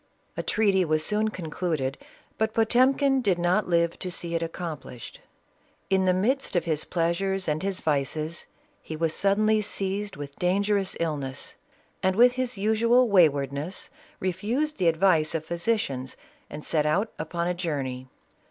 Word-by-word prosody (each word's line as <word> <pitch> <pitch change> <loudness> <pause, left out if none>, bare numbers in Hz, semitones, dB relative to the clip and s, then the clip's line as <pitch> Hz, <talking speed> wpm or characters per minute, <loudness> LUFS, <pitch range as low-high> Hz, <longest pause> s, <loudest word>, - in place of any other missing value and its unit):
A - - -2
treaty 200 -3 +2
was 155 -2 +1
soon 215 +1 +2
concluded, 160 -7 -3 0.4
but 220 0 0
Potemkin 260 +4 +3
did 195 -7 +2
not 180 +3 +1
live 170 -1 +1
to 185 - -4
see 170 -1 -4
it 165 - 0
accomplishes. 165 -7 -6 0.7
In 190 -1 +3
the 185 - +4
midst 250 +6 0
of 175 - +1
his 155 -2 0
pleasures 185 +3 -1
and 155 0 0
hi.s 195 -1 -2
vices, 155 +2 -2 0.3
he 160 - -7
was 165 0 0
suu^.nlv 215 +2 +2
seized 200 0 -3
with 140 0 -8
dangerous 200 +2 +1
illness, 145 -5 -3 0.5
and 190 0 +1
with 245 +3 +6
his 250 -2 -3
usual 230 +4 +3
waj 185 -7 +6
vardness, 140 +5 -4 0.3
refused 220 - -1
the 180 - +2
advice 165 -2 +3
of 160 -1 -2
physicians 170 - -2 0.3
and 150 - -8
set 150 -2 +1
out 200 +9 +1
upon 170 +2 -2
a 180 - +1
journey. 140 -8 -3
180 Hz, 150 wpm, -26 LUFS, 155-210 Hz, 0.7 s, with